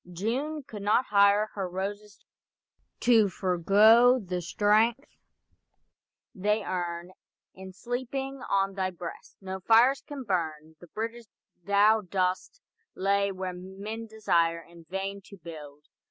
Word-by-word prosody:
June 260 Hz, -, -3 dB
could 215 Hz, -5 st, -9 dB
not 210 Hz, +5 st, +2 dB
hire 200 Hz, +1 st, +4 dB
Her 195 Hz, -3 st, -4 dB
roses 205 Hz, +3 st, -5 dB, 0.8 s
to 225 Hz, -4 st, +4 dB
forego 205 Hz, +8 st, +5 dB
the 180 Hz, -6 st, -4 dB
strength 215 Hz, -, +2 dB, 1.3 s
they 210 Hz, +3 st, 0 dB
learn 175 Hz, -2 st, -4 dB, 0.4 s
In 190 Hz, 0 st, -10 dB
sleeping 260 Hz, +6 st, -5 dB
on 195 Hz, 0 st, +1 dB
thy 190 Hz, -1 st, -1 dB
breast. 175 Hz, -2 st, -9 dB
No 190 Hz, 0 st, -6 dB
fires 230 Hz, +7 st, +4 dB
can 285 Hz, -2 st, -8 dB
burn 160 Hz, -6 st, -3 dB
The 175 Hz, -, -14 dB
bridges 230 Hz, +5 st, -6 dB, 0.4 s
thou 205 Hz, +3 st, +4 dB
dost 185 Hz, -, -2 dB, 0.4 s
lay 200 Hz, +1 st, +1 dB
where 185 Hz, -1 st, -5 dB
men 200 Hz, +5 st, -7 dB
desire 170 Hz, -6 st, +1 dB
In 170 Hz, 0 st, -17 dB
vain 195 Hz, +3 st, -4 dB
to 200 Hz, -, -13 dB
build. 150 Hz, -4 st, -11 dB
200 Hz, 125 wpm, -28 LUFS, 180-220 Hz, 1.3 s, forego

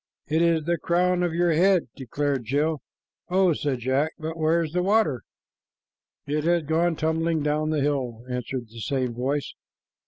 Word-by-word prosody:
"It 160 Hz, +2 st, +1 dB
is 165 Hz, -2 st, +3 dB
the 170 Hz, +2 st, 0 dB
crown 180 Hz, +1 st, +1 dB
of 175 Hz, -2 st, 0 dB
your 175 Hz, 0 st, +2 dB
head," 185 Hz, +2 st, +4 dB
declared 135 Hz, 0 st, -2 dB
Jill. 145 Hz, +5 st, 0 dB, 0.5 s
"Oh!" 185 Hz, -1 st, +3 dB
said 140 Hz, -4 st, -2 dB
Jack; 135 Hz, +6 st, 0 dB
"but 160 Hz, +1 st, -5 dB
where's 160 Hz, 0 st, +1 dB
the 180 Hz, -, +1 dB
water?" 195 Hz, -, +2 dB, 1.0 s
"It 150 Hz, +1 st, -1 dB
has 170 Hz, 0 st, +2 dB
gone 165 Hz, +3 st, +1 dB
tumbling 160 Hz, 0 st, 0 dB
down 150 Hz, +1 st, 0 dB
the 155 Hz, -2 st, 0 dB
hill," 130 Hz, -5 st, -1 dB
answered 125 Hz, -1 st, -4 dB
the 115 Hz, +1 st, -11 dB
same 130 Hz, -1 st, -1 dB
voice. 135 Hz, +4 st, -2 dB
155 Hz, 160 wpm, -25 LUFS, 135-170 Hz, 1.0 s, head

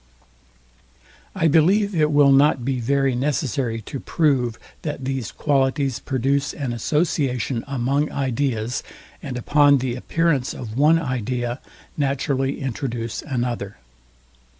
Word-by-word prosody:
I 165 Hz, -4 st, +2 dB
believe 190 Hz, +7 st, +3 dB
it 155 Hz, -3 st, +2 dB
will 145 Hz, -2 st, +5 dB
not 135 Hz, -2 st, +4 dB
be 135 Hz, -1 st, -1 dB
very 135 Hz, +2 st, +1 dB
necessary 130 Hz, -, -1 dB
to 135 Hz, -, -6 dB
prove, 130 Hz, -9 st, +1 dB, 0.2 s
that 145 Hz, -4 st, -4 dB
these 130 Hz, -5 st, -3 dB
qualities 135 Hz, -2 st, 0 dB
produce 135 Hz, +2 st, 0 dB
an 135 Hz, -5 st, -3 dB
association 130 Hz, -, 0 dB
among 140 Hz, +2 st, 0 dB
ideas, 130 Hz, -3 st, -1 dB, 0.4 s
and 130 Hz, -4 st, -5 dB
upon 145 Hz, +3 st, +4 dB
the 125 Hz, -2 st, -2 dB
appearance 150 Hz, 0 st, 0 dB
of 110 Hz, -3 st, -7 dB
one 150 Hz, +5 st, +5 dB
idea 125 Hz, -4 st, -2 dB, 0.4 s
naturally 135 Hz, -1 st, 0 dB
introduce 120 Hz, -3 st, -3 dB
another. 120 Hz, -, -3 dB
135 Hz, 115 wpm, -22 LUFS, 125-145 Hz, 0.4 s, will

